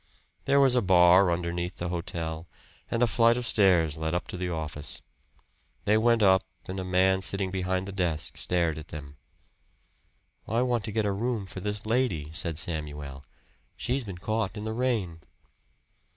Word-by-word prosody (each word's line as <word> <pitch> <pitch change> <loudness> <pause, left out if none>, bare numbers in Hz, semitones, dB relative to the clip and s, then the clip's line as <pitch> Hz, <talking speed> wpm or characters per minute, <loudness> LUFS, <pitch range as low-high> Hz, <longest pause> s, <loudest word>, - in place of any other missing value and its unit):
There 140 +1 +4
was 135 -2 +5
a 125 - +3
bar 90 0 +6
underneath 85 +1 -2
the 85 - -3
hotel, 85 -1 -4 0.4
and 115 +1 +1
a - - +7
flight 115 +1 +3
of 125 - -3
stairs 90 -9 +3
led 80 +1 -2
up 90 - -2
to - - -5
the 90 0 -2
office. 75 -3 -4 0.9
They 105 - +4
went 115 0 +3
up, 95 -1 +6 0.3
and 95 +1 -4
a - - -3
man 95 +1 +2
sitting 95 0 -1
behind 95 0 -1
the - - -5
desk 90 -5 -2
stared 85 -3 0
at 80 - -11
them. 70 -2 -9 1.3
"I 115 +3 +1
want 120 -4 0
to 110 - -4
get 110 0 0
a 100 - +1
room 110 +1 -2
for 95 - -6
this 105 +2 -4
lady," 110 - 0
said 85 -2 -1
Samuel. 75 -4 -4 0.5
"She's 130 +2 -1
been 95 -5 -7
caught 110 +1 -2
in 105 - -5
the 110 - -2
rain." 110 -9 -1
95 Hz, 175 wpm, -28 LUFS, 85-110 Hz, 1.3 s, a